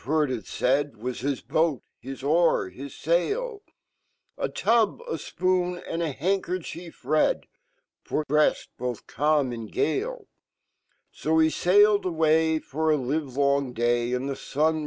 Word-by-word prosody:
heardit 135 -3 0
faid 140 +2 0
Was 125 +3 -5
hiiboat, 145 +2 0 0.2
hii 135 +2 -6
o^r, 155 - +2
his 140 +6 -9
sail? 410 - 0 0.7
A - - -2
tub, 230 - +2
a 475 -1 -5
fpn, 180 -1 -1
and 165 - -2
a 165 -3 -1
handkerchief 175 +1 -3
red, 155 - +2 0.6
to 155 - -1
bread 150 +2 +4 0.2
bofh 125 -2 -4
cairn 150 -3 +1
send 115 -2 -7
gale. 425 +2 -1 0.9
S - - -15
He 160 0 +4
sailed 205 +4 +4
away, 160 -1 +3
for 155 +1 -1
a 150 - +3
livelon 140 -1 0 0.4
And 130 +2 -3
fhe 135 - -4
sun. 155 +3 0
155 Hz, 130 wpm, -26 LUFS, 140-180 Hz, 0.9 s, bread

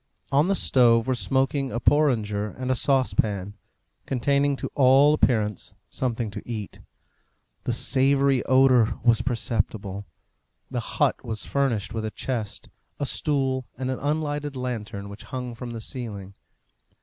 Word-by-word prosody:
On 145 +4 +3
the 195 - +2
stove 115 -8 +4
were 130 - +1
smoking 135 +1 0
a 120 - -2
porringer 110 -9 +1
and 130 0 -2
a - - +2
saucepan, 110 -7 0 0.5
containing 140 +2 +1
to - - -6
all 135 +2 +5
appearance 110 - 0
something 120 -4 -2
to - - -6
eat. 110 -4 -6 0.9
The - - 0
savoury 135 +2 +3
odour 130 -3 +4
was 115 -2 +4
perceptible. 105 -5 -2 0.6
The - - -1 0.2
hut - - +1
was 110 -2 -5
furnished 120 -8 -1
with 110 -1 -3
a 110 - -2
chest, 110 -2 -5 0.3
a 145 - -1
stool, 135 -3 0
and 130 0 -2
an 130 - -4
unlighted 145 -1 -2
lantern 110 -5 -5
which 100 +1 -10
hung 125 -2 -5
from 120 +1 -7
the 115 -1 -6
ceiling. 105 -6 -5
125 Hz, 140 wpm, -25 LUFS, 110-135 Hz, 0.9 s, all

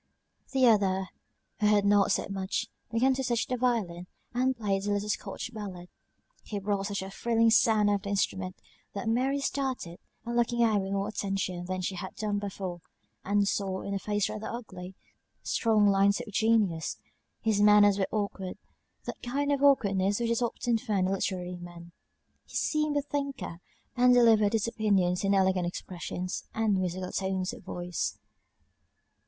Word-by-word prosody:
The 265 -2 +3
other, 190 -4 +3 0.5
who 210 - +3
had 205 -1 +4
not 200 -1 +4
said - - 0
much, 190 -1 -2 0.3
began 250 +4 +3
to 265 +1 -2
touch 240 -3 0
the 255 - -2
violin, 215 -9 -1 0.3
and 255 +1 +1
played 200 -2 -1
a - - +1
little 205 +1 -2
Scotch 210 +3 -4
ballad; 190 -5 -7 0.5
he 210 - -5
brought 200 0 -1
such 200 -2 -3
a 190 - -7
thrilling 230 +2 +2
sound 220 -2 +4
out 205 0 +3
of - - -12
the 200 - -6
instrument, 190 -2 -1 0.4
that 200 +3 -4
Mary 260 +5 +1
started, 260 -11 -3 0.3
and 235 0 -3
looking 240 0 +2
at 225 -2 +3
him - - +1
with 190 0 -4
more 195 0 0
attention 195 -4 -2
than 185 0 -3
she 185 - -2
had 190 +1 -6
done 210 -1 -1
before, 190 -3 -5 0.4
and 200 0 +2
saw, 190 -2 -1
in 200 - -4
a 195 - -1
face 205 0 0
rather 215 - -5
ugly, 190 -6 -7 0.5
strong 220 -3 +2
lines 200 0 +4
of 210 - -8
genius. 210 - +1 0.4
His 215 -2 +1
manners 205 -1 +6
were 190 - +1
awkward, 200 -3 -3 0.5
that - - -7
kind 285 +4 -1
of 280 -1 +1
awkwardness 200 -8 +3
which 235 -1 0
is 235 - +1
often 235 0 0
found 195 -4 0
in - - +1
literary 180 -2 -2
men: 175 -1 -11 0.6
he - - -13
seemed 305 -1 +1
a 285 - 0
thinker, 280 -11 -4 0.4
and 250 0 +5
delivered 225 -3 +5
his 225 0 +1
opinions 195 -6 +1
in 200 0 +3
elegant 190 -2 +2
expressions, 180 +1 -5
and 215 -3 +2
musical 185 0 -3
tones 190 -1 -1
of - - -10
voice. 175 -1 -3
205 Hz, 175 wpm, -29 LUFS, 190-230 Hz, 0.6 s, manners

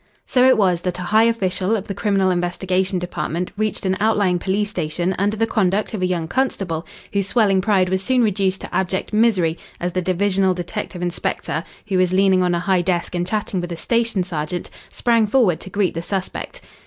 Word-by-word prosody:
So 250 - +3
it 260 -2 +6
was 180 -5 +2
that 180 -1 -2
a 180 - -5
high 215 +5 +4
official 200 -2 +1
of 205 -2 -3
the 200 - -3
Criminal 195 -1 +1
Investigation 180 +1 0
Department 175 0 -3
reached 215 0 -2
an 190 0 +1
outlying 205 -4 +2
police 200 +3 -1
station 175 +2 -1
under 205 +2 +1
the 225 - +2
conduct 210 -1 0
of 210 - -3
a 185 - +2
young 170 -3 -1
constable 180 -8 -1 0.3
whose 200 -1 0
swelling 200 -4 +3
pride 195 -2 +2
was 190 +1 0
soon 250 +3 +2
reduced 195 -3 0
to - - -7
abject 190 +2 -1
misery 200 -7 +2 0.2
as 175 0 -2
the 185 - 0
divisional 190 +1 +1
detective 180 +1 -5
inspector, 170 -3 -2 0.2
who 195 -3 0
was 185 0 +2
leaning 190 -1 +4
on 180 -1 +2
a - - 0
high 185 0 +2
desk 175 -1 -1
and 175 0 -1
chatting 200 -2 -2
with 175 0 -5
a 170 - -4
station 230 -2 0
sergeant, 170 0 -4 0.2
sprang 230 -2 +2
forward 205 -8 +3
to - - -8
greet 195 -2 0
the 165 - -3
suspect. 195 - -4
190 Hz, 205 wpm, -21 LUFS, 180-210 Hz, 0.3 s, it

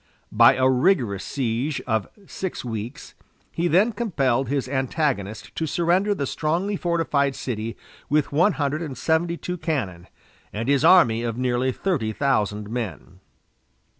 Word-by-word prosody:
By - - +6
a 130 0 +3
rigorous 130 - +2
siege 130 +2 -2
of 110 -4 0 0.2
six 190 -7 -5
weeks 115 +6 -6 0.4
he 170 +1 -1
then 190 +8 +4
compelled 135 - 0
his 140 -2 -1
antagonist 130 - -2
to 160 - -2
surrender 180 +6 +1
the 140 - -2
strongly 170 +9 -1
fortified 160 -6 0
city 115 -2 -4 0.3
with 150 0 +1
one 175 +8 +3
hundred 145 +1 -1
and 145 -6 -5
seventy 165 +1 0
two 180 +1 -5
cannon, 100 - -3 0.4
and 115 +3 -4
his 140 0 +2
army 160 -10 +6
of 115 -1 -3
nearly 125 +1 0
thirty 130 - -1
thousand 105 -6 0
men. 110 - -6
140 Hz, 140 wpm, -23 LUFS, 115-165 Hz, 0.4 s, By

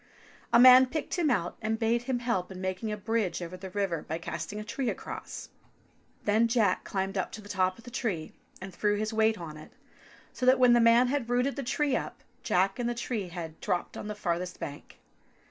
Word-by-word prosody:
A 235 - +6
man 255 +1 +9
picked 310 +4 -4
him 320 -4 +2
out 175 -9 0
and 220 0 -1
bade 230 +1 +1
him 255 - +1
help 235 -7 -2
in 185 - -8
making 185 +4 -3
a 210 - -3
bridge 210 -4 -1
over 175 0 -6
the 190 +1 -8
river 185 -4 -1
by 160 - -4
casting 165 +4 -5
a - - -5
tree 245 +3 -2
across. - - -6 0.7
Then 220 +3 +3
Jack 225 -6 +2
climbed 195 0 -2
up 185 - -2
to - - -6
the - - -12
top 185 -2 0
of 230 - -15
the 245 - -11
tree 185 -11 -3 0.3
and 190 0 -8
threw 205 +3 +1
his 215 +2 -2
weight 220 0 +3
on 155 -3 -8
it, 155 - -12 0.6
so - - -8
that 260 +1 +7
when 250 -1 +6
the 240 - +5
man 235 +2 +5
had 265 -4 -1
rooted 250 +3 +1
the 280 - -3
tree 275 +2 0
up, - - -4 0.2
Jack 195 +5 +1
and 240 -1 0
the 240 - -2
tree 230 -4 -3
head 170 -2 -7
dropped 180 - -2
on - - -6
the 210 - -4
farther 180 -3 -1
bank. 145 0 -8
210 Hz, 220 wpm, -29 LUFS, 185-240 Hz, 0.7 s, man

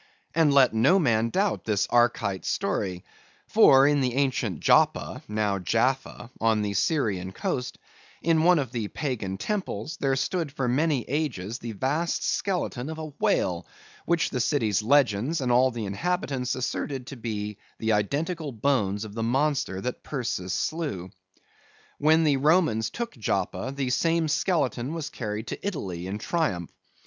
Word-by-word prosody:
And 160 -3 +4
let 135 -4 +5
no 125 +12 +4
man 115 - +2
doubt 195 - 0
this 105 -2 +1
Arkite 115 -5 +2
story; 90 -2 -2 0.4
for 135 0 +6
in 145 0 +3
the 125 -2 0
ancient 130 - 0
Joppa, - - +2
now 105 -2 0
Jaffa, 120 +4 -1
on 110 -1 +2
the 100 -1 -2
Syrian 100 - 0
coast, 125 +6 -3 0.5
in 165 -1 +3
one 175 +2 +5
of 135 -6 -2
the 115 -4 -2
Pagan 110 -8 -3
temples, 155 - -3
there 135 -1 +1
stood 165 +2 -1
for 135 -2 -2
many 140 +1 +1
ages 125 -7 -2
the 115 -1 -6
vast 145 - -1
skeleton 170 -9 -1
of 160 - -5
a 155 -1 -5
whale, 85 -3 +1 0.4
which 170 -1 +1
the 125 - -2
city's 115 -6 +1
legends 130 +3 +2
and 125 -3 0
all 125 +2 +5
the 115 -3 -5
inhabitants 135 - -2
asserted 130 0 -3
to 140 0 -8
be 105 -3 -5 0.2
the 110 0 0
identical 145 - -1
bones 110 -4 0
of 105 - -9
the 115 - -4
monster 130 -5 0
that 125 +3 -4
Perseus 105 -9 -3
slew. 125 - -3 0.9
When 160 +2 +4
the 145 -3 +3
Romans 145 -7 +3
took 235 0 -5
Joppa, 100 0 -2
the 135 -2 -1
same 165 +4 +2
skeleton 150 -4 0
was 155 -2 -4
carried 105 -2 -4
to - - -6
Italy 95 - -4
in 100 +2 -3
triumph. 105 - -1
125 Hz, 155 wpm, -26 LUFS, 105-150 Hz, 0.9 s, for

